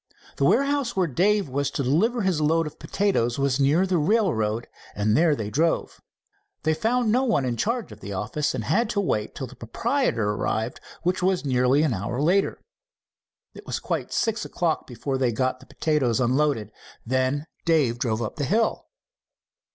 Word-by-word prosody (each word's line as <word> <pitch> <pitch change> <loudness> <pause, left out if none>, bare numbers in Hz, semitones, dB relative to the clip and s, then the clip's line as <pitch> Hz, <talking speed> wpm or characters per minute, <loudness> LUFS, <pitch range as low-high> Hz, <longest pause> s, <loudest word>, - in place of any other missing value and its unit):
The 140 - +2
warehouse 275 - +2
where 190 -2 +2
Dave 190 +6 +2
was 140 +1 -1
to 140 - -2
deliver 210 - +2
his 185 -5 +1
load 165 +2 +2
of 150 - -8
potatoes 190 - 0
was 140 -1 +1
near 145 +7 +3
the 185 -3 +1
railroad, 150 - +1 0.3
and 105 +1 +1
there 160 +1 +4
they 105 -4 -4
drove. 165 +6 0 0.6
They 160 - +2
found 225 +6 +1
no 250 +4 +3
one 225 - +1
in 120 -2 -1
charge 230 - -2
of 105 - -11
the 100 - -8
office, 150 - -2
and - - -3
had 230 +2 +1
to 220 - 0
wait 110 - -1
till 130 - -4
the 130 +1 -12
proprietor 120 - 0
arrived, 110 +3 -2 0.2
which 180 +1 0
was 185 -3 +1
nearly 130 +2 +3
an 150 -6 +1
hour 105 +5 -3
later. 180 +7 +2 0.9
It - - -13
was - - -2
quite - - -3
six 225 0 0
o'clock 170 -3 -1
before 130 +2 -3
they 125 -2 +2
got 130 +3 -1
the - - -17
potatoes 140 -7 0
unloaded. 130 -3 +1 0.3
Then 130 +4 0 0.2
Dave 145 -8 +2
drove 115 -2 -1
up 110 - -5
the 145 - -1
hill. 220 - 0
150 Hz, 180 wpm, -25 LUFS, 125-190 Hz, 0.9 s, there